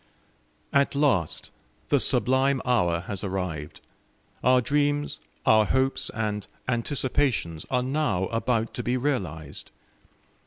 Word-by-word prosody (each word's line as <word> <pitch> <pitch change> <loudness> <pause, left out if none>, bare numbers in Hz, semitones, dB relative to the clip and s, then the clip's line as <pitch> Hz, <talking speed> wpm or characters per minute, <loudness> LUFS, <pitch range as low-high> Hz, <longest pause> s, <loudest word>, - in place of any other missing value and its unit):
At 140 0 +3
last 130 - +1 0.4
the - - +4
sublime 130 +1 +2
hour 90 -10 +2
has 100 +2 -4
arrived; 90 -6 -4 0.6
our 125 +1 +5
dreams, 145 +3 0 0.3
our 110 -1 +6
hopes, 130 +3 0
and 105 -2 -2 0.2
anticipations 125 - 0
are 125 -1 +1
now 135 -8 0
about 115 0 0
to - - -3
be 120 +2 0
realised! 90 - -3
120 Hz, 110 wpm, -26 LUFS, 95-135 Hz, 0.6 s, our